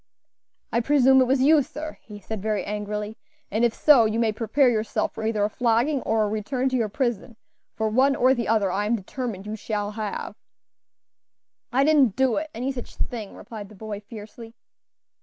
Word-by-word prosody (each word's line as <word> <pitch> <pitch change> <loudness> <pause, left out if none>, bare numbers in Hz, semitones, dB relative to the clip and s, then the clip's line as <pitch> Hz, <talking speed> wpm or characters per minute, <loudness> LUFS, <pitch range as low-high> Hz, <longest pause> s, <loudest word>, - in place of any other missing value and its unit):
"I 235 - +3
presume 265 +1 +5
it - - +4
was 260 0 +2
you, 305 +1 +6
sir," 305 +3 -7
he 210 -2 -11
said 210 +1 -6
very 210 -2 -1
angrily, 210 +1 -4 0.3
"and 220 +4 0
if 240 - +4
so, 275 -7 +6
you 220 +1 0
may 230 -1 +2
prepare 230 +5 +2
yourself 220 -3 0
for 220 - -6
either 215 -2 0
a 205 - +1
flogging 245 +4 +1
or 220 -1 +1
a - - +1
return 250 +5 -1
to 260 - -2
your 230 -4 0
prison, 235 -1 -2 0.4
for 220 - 0
one 260 +5 +3
or 260 -1 +4
the 240 -3 -2
other 215 -4 +2
I 205 +3 -1
am 235 - +2
determined 215 -1 -5
you 210 +1 -4
shall 210 -1 -3
have." 215 -1 -5 1.4
"I 265 +3 +3
didn't 280 -8 +4
do 260 -3 +2
it, 315 +1 -3
any 250 +4 -2
such 250 -3 -8
thing," 220 -5 -5
replied 215 -4 -9
the 215 - -14
boy, 210 0 -6
fiercely. 220 +2 -11
225 Hz, 195 wpm, -24 LUFS, 210-260 Hz, 1.4 s, you